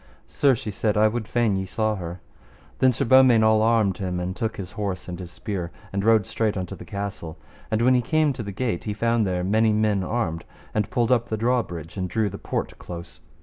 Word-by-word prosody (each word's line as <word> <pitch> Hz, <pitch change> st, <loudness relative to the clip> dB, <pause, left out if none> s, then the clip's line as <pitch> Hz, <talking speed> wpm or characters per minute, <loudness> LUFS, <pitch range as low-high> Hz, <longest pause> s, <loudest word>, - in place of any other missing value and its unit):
Sir, 140 Hz, -3 st, +2 dB
she 110 Hz, -1 st, -5 dB
said, 105 Hz, +1 st, 0 dB
I 110 Hz, +1 st, +5 dB
would 110 Hz, 0 st, -3 dB
fain 115 Hz, -4 st, +1 dB
ye 95 Hz, 0 st, -2 dB
saw 110 Hz, +2 st, 0 dB
her. 85 Hz, -1 st, -6 dB, 0.6 s
Then 130 Hz, -, +5 dB
Sir 130 Hz, +3 st, -1 dB
Beaumains 130 Hz, -2 st, +6 dB
all 110 Hz, 0 st, +4 dB
armed 110 Hz, -4 st, +2 dB
him, 90 Hz, -2 st, -2 dB
and 90 Hz, +1 st, -3 dB
took 110 Hz, -1 st, -3 dB
his 95 Hz, -3 st, -6 dB
horse 100 Hz, -4 st, -4 dB
and 90 Hz, 0 st, -6 dB
his 90 Hz, -2 st, -8 dB
spear, 90 Hz, +1 st, -4 dB, 0.2 s
and 100 Hz, 0 st, -1 dB
rode 110 Hz, -2 st, +4 dB
straight 110 Hz, -3 st, -1 dB
unto 90 Hz, -2 st, -4 dB
the -, -, -11 dB
castle. 100 Hz, -5 st, -5 dB, 0.3 s
And 110 Hz, +1 st, +1 dB
when 130 Hz, +1 st, +5 dB
he 125 Hz, -, +4 dB
came 155 Hz, +2 st, +2 dB
to 125 Hz, -, -6 dB
the 100 Hz, -2 st, -5 dB
gate 110 Hz, -3 st, -2 dB
he 105 Hz, -2 st, -2 dB
found 115 Hz, -1 st, +1 dB
there 90 Hz, -1 st, -1 dB
many 110 Hz, +4 st, +3 dB
men 105 Hz, -2 st, +2 dB
armed, 90 Hz, -7 st, -2 dB, 0.3 s
and 105 Hz, -1 st, 0 dB
pulled 120 Hz, 0 st, +1 dB
up 120 Hz, -1 st, +2 dB
the 110 Hz, -, -1 dB
drawbridge 105 Hz, -9 st, -1 dB
and 90 Hz, -1 st, -2 dB
drew 105 Hz, +1 st, 0 dB
the -, -, -7 dB
port -, -, -4 dB
close. 85 Hz, -1 st, -9 dB
105 Hz, 230 wpm, -24 LUFS, 95-115 Hz, 0.6 s, Beaumains